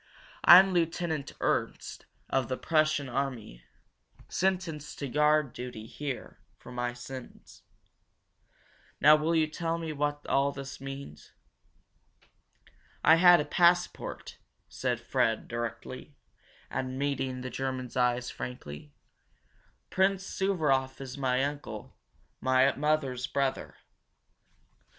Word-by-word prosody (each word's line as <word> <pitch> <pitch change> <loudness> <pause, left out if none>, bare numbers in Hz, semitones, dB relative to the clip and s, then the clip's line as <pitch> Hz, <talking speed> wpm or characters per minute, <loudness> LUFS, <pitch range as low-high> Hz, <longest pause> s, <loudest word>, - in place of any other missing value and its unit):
"I'm 190 +2 +9
Lieutenant 165 -3 -1
Ernst, - - -2 0.2
of 135 -2 0
the 130 - -2
Prussian 155 -3 +1
army. 125 - -4 0.7
Sentenced 180 -5 -2
to 140 - -4
guard 150 0 +2
duty 120 -3 -7
here 135 +3 -6 0.2
for - - -13
my 120 0 -2
sins. 125 +1 -10 1.4
Now 150 +1 +8
will 155 +2 0
you 160 -1 +4
tell 165 +2 -3
me 165 -2 -4
what 145 0 -2
all 140 +1 +2
this 135 -1 -8
means?" 135 - -9 1.7
"I 160 - +7
had 175 0 +8
a 150 - -1
passport," 175 +3 +1 0.3
said - - -2
Fred 110 -1 0
directly, 120 0 -6 0.6
and 130 0 -3
meeting 135 -2 -2
the 130 0 -6
German's 130 -1 -4
eyes 125 0 +1
frankly. 75 -12 -8 1.0
"Prince 190 0 +2
Suvaroff 150 -11 0
is 130 -1 -7
my 130 -2 +1
uncle, 145 +1 -5 0.5
my 130 +1 +3
mother's 140 -4 0
brother. 135 -1 -2
140 Hz, 110 wpm, -29 LUFS, 130-155 Hz, 1.7 s, I'm